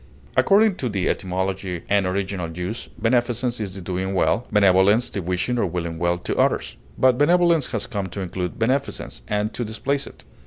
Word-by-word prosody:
According 200 -1 +4
to 125 - -2
the 95 -4 -1
etymology 95 -1 -2
and 100 -2 +2
original 95 -2 -2
usage, 90 +7 -5
beneficence 120 +1 +1
is 100 -3 -4
the 95 - -7
doing 95 +2 -3
well, 115 +5 +1
benevolence 100 +2 +4
the 100 - -3
wishing 90 +8 -1
or 100 - +2
willing 85 -1 -4
well 85 +1 +1
to 90 - -3
others; - - +1 0.2
but 130 -1 +4
benevolence 170 -1 +4
has 110 -4 -2
come 100 -2 -3
to 100 +2 -6
include 90 -1 -4
beneficence, 130 +5 -1
and 105 +1 -1
to 120 - -3
displace 130 +6 -2
it. - - -14
100 Hz, 180 wpm, -23 LUFS, 90-120 Hz, 0.2 s, According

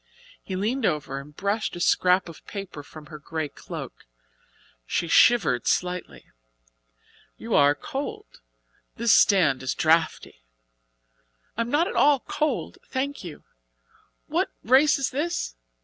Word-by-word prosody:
He 190 - -6
leaned 225 +8 -1
over 145 -3 -1
and 145 +2 -13
brushed 200 +3 -2
a - - -6
scrap 180 +1 +3
of 165 - -12
paper 195 -7 -7
from 150 +1 -13
her 155 -1 -10
grey 155 0 -4
cloak. - - -9 0.8
She 170 - -1
shivered 185 - +4
slightly. 180 - -2 1.1
"You - - -5
are 145 0 +5
cold! 275 - -7 0.5
This 230 0 +3
stand 165 -10 +4
is 130 0 -2
draughty." 160 - +1 1.1
"I 230 - -1
am 230 - -2
not 310 +6 +2
at - - -4
all 285 -3 +4
cold, 305 0 -2
thank 280 0 -3
you. 170 -5 -9 0.8
What - - 0
race 265 +6 +5
is 275 - -1
this? 305 - -2
180 Hz, 135 wpm, -25 LUFS, 150-255 Hz, 1.1 s, are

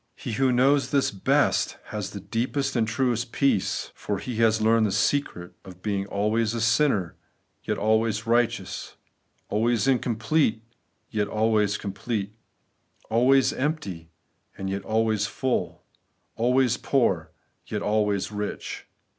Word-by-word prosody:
He 125 - -6
who 130 +3 +2
knows 135 +3 +3
this 140 -2 +2
best 95 - +1
has - - -4
the - - -7
deepest 130 +5 -2
and 115 -2 +2
truest 125 0 0
peace:, 135 -9 0
for 100 - -3
he 110 +4 -5
has 110 -1 +3
learned 110 0 +3
the - - -2
secret 100 -5 0
of 90 -1 -13
being 100 -2 -1
always 110 +3 0
a - - -1
sinner, 115 - +2 0.5
yet - - -1
always 110 0 +1
righteous; 120 0 0 0.5
always 115 +2 +1
incomplete, 120 -1 +1 0.5
yet 105 -2 0
always 105 -1 +1
complete; 100 +1 -4 0.8
always 130 +4 +4
empty, 105 - -3 0.5
and 95 0 -3
yet 100 0 -2
always 110 -1 +1
fuU; 120 -10 -2 0.6
always 125 +1 +2
poor,*and 95 - -2
yet - - -2
always 105 -1 0
rich. 105 0 -5
110 Hz, 130 wpm, -25 LUFS, 105-125 Hz, 0.8 s, always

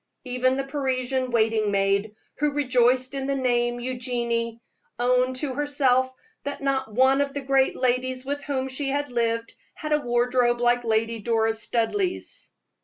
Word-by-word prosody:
Even 255 +1 +1
the 275 - -1
Parisian 260 -2 -1
waiting 220 -2 +2
maid, 200 +2 +1 0.2
who 295 0 +1
rejoiced 255 -2 +2
in 270 -1 -3
the 275 - 0
name 240 -2 +1
of 240 - -7
Eugenie, 235 -2 -2 0.4
owned 250 +1 +2
to 265 0 -3
herself 265 -2 +2 0.3
that 285 - -4
not 270 -4 -1
one 260 +4 +4
of 280 0 -2
the 285 - -2
great 270 0 +2
ladies 255 0 0
with 285 +1 -3
whom 265 -2 -1
she 270 +1 -2
had 285 0 -1
lived 230 -1 -1 0.2
had 305 -1 -3
a 300 - +2
wardrobe 240 -1 +2
like 240 0 +2
Lady 225 0 0
Doris 225 0 +1
Studleigh's! 355 - -2
255 Hz, 160 wpm, -25 LUFS, 235-270 Hz, 0.4 s, one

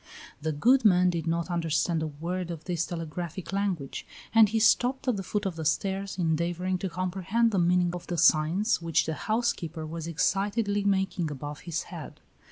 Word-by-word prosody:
The 160 +1 -1
good 245 - +4
man 180 -3 +5
did 165 -2 -3
not 170 +1 -1
understand 165 0 0
a 160 - -1
word 170 +4 -4
of 165 -2 -6
this 170 -1 -2
telegraphic 170 +2 -5
language, 190 -9 -2 0.3
and 225 -2 +7
he 225 - 0
stopped 245 +4 +3
at 250 - +2
the 195 - -3
foot 205 +2 -3
of 180 -4 -3
the 160 - -4
stairs, 195 +5 -1
endeavoring 175 +2 0
to 190 - -3
comprehend 185 +6 0
the 195 - +1
meaning 175 0 +3
of 180 - -7
the 175 - -3
signs 165 +7 +3
which 165 -1 +1
the 160 - -2
housekeeper 175 -6 -2
was 165 +1 -6
excitedly 205 +5 0
making 190 -4 0
above 145 +1 -6
his 170 -1 -3
head. - - -9
175 Hz, 180 wpm, -28 LUFS, 165-200 Hz, 0.3 s, and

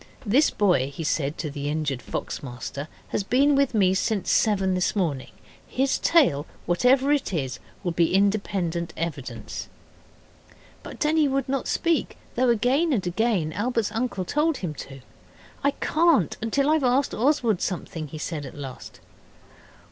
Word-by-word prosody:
This 255 +9 +4
boy,' 175 -10 +2
he 165 +3 -6
said 145 -1 -1
to 150 - -4
the 145 0 -4
injured 145 -4 -2
fox - - -5
master, 140 +2 -6 0.2
'has - - -1
been 275 +8 +3
with 275 -3 +2
me 190 -3 +4
since 205 +1 0
seven 195 -4 +2
this 185 +3 0
morning. 155 -10 -1 0.4
His 265 +1 0
tale, 205 - +3 0.2
whatever 255 +10 +3
it 290 -7 +1
is, 130 -5 -3 0.2
will 175 - 0
be 170 +1 +2
independent 195 -4 0
evidence.' 130 -9 -5 1.1
But - - -9
Denny 310 0 +3
would 270 -1 -1
not 270 -1 -1
speak, 335 -2 0 0.2
though 250 +1 +2
again 255 +8 +2
and 205 -8 0
again 180 -4 0
Albert's 230 +2 -1
uncle 225 -5 -2
told 300 - +1
him 175 -5 -4 0.2
to. 135 -1 -11 0.6
'I 280 - +4
can't 315 - +3
till 280 +5 +2
I've 310 -2 +2
asked 260 +2 +2
Oswald 235 - +2
something,' 165 -4 -3
he 155 - -8
said 150 0 -4
at 130 - -11
last. 135 -3 -9
200 Hz, 155 wpm, -25 LUFS, 155-265 Hz, 1.1 s, This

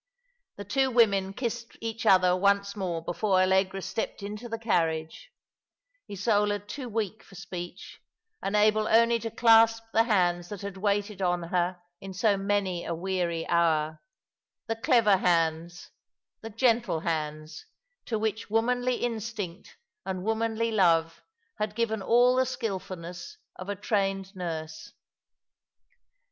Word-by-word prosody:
The 205 - -7
two 265 +6 +1
women 200 -6 +3
kissed 235 +2 -5
each 225 0 -4
other 185 -2 +5
once 200 +1 +1
more 175 -5 -3
before 190 +3 0
AUegra 190 +1 +2
stepped 195 +1 -4
into 210 +4 -6
the 230 - -3
carriage, 165 - -1 0.8
Isola 205 +1 +1
too 240 +6 -8
weak 220 -1 -3
for 195 - -17
speech, 180 -1 -8 0.4
and 200 - -2
able 215 +1 +3
only 230 +1 +4
to 225 - -4
clasp 225 0 +5
the 225 +1 +4
hands 175 -5 +1
that 205 -3 -7
had 200 -1 -6
waited 205 0 -1
on 175 -1 0
her 175 +1 -1 0.2
in 195 -1 -9
so 205 +1 +3
many 195 -3 -1
a 170 - -3
weary 175 -2 -2
hour; 160 -2 +1 0.6
the 225 - -2
clever 225 -5 +4
hands, 170 0 0 0.5
the 225 - -7
gentle 225 -6 +1
hands, 155 -1 -4 0.4
to 225 - -2
which 220 +1 -3
womanly 245 +3 +1
instinct 220 -6 -5 0.3
and 185 -1 -4
womanly 225 +1 0
love 165 -5 +2 0.4
had 210 0 -2
given 220 -2 -1
all 245 +4 +4
the 260 0 +2
skilfulness 190 - -5 0.2
of 185 +2 -8
a 205 - -2
trained 195 -1 -1
nurse. 160 -3 -6
200 Hz, 135 wpm, -27 LUFS, 180-225 Hz, 0.8 s, other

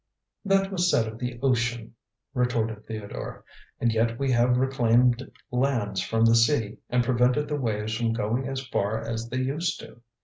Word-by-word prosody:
'" - - -49
"That 195 0 +2
was 180 -2 +1
said 115 -9 +2
of 110 +1 -8
the 125 -1 -4
ocean," 120 -3 0 0.4
retorted 115 -4 -1
Theodore. 110 -2 -7 0.3
"And 120 - +2
yet 115 +1 +1
we 135 0 0
have 125 0 +3
reclaimed 125 -1 +2 0.2
lands 120 -7 0
from 115 +4 +1
the 115 - +5
sea 115 -3 +2
and 125 0 +2
prevented 125 +4 +2
the 145 -1 -2
waves 110 -2 -1
from 115 -1 0
going 120 +3 -1
as 135 0 -4
far 110 -3 -1
as 115 0 -4
they 130 - -3
used 140 +6 -1
to. 120 - -13
120 Hz, 175 wpm, -26 LUFS, 115-130 Hz, 0.4 s, the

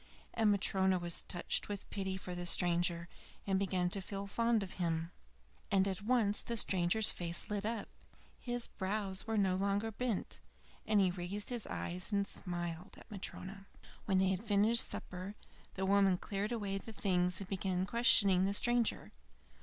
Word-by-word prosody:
And 220 -2 +3
Matryona 190 -1 +2
was 175 -1 +1
touched 175 - -3
with 205 -1 -5
pity 190 -1 -3
for 185 -1 -7
the 175 0 -3
stranger, 170 -1 +3 0.4
and 195 -1 +1
began 185 -2 0
to 195 - -3
feel 195 +1 -5
fond 230 +1 +1
of 185 - -7
him. 165 0 -1 0.6
And 195 -1 +3
at 190 -1 -3
once 215 -2 +3
the 235 - -3
stranger's 190 +2 +3
face 170 +3 -4
lit 210 0 -1
up; 225 -2 -3 0.5
his 240 -1 -2
brows 195 0 -2
were 225 -1 0
no 190 -2 +2
longer 200 +3 0
bent, 230 -1 -3 0.5
he 200 -4 +4
raised 180 +3 -3
his 240 -4 -3
eyes 180 +4 -3
and 200 -1 +1
smiled 175 0 -4
at - - -15
Matryona. 195 0 -7 0.4
When 195 -2 +2
they 190 0 +3
had 190 +2 -1
finished 220 +2 +5
supper, 185 +3 -7 0.4
the 190 - -1
woman 195 -1 +4
cleared 200 +4 -3
away 200 -4 -2
the 225 - -10
things 180 -3 +1
and 195 - -6
began 185 -1 -1
questioning 200 -4 +4
the 200 +1 +1
stranger. 240 +1 +1
195 Hz, 165 wpm, -35 LUFS, 180-210 Hz, 0.6 s, finished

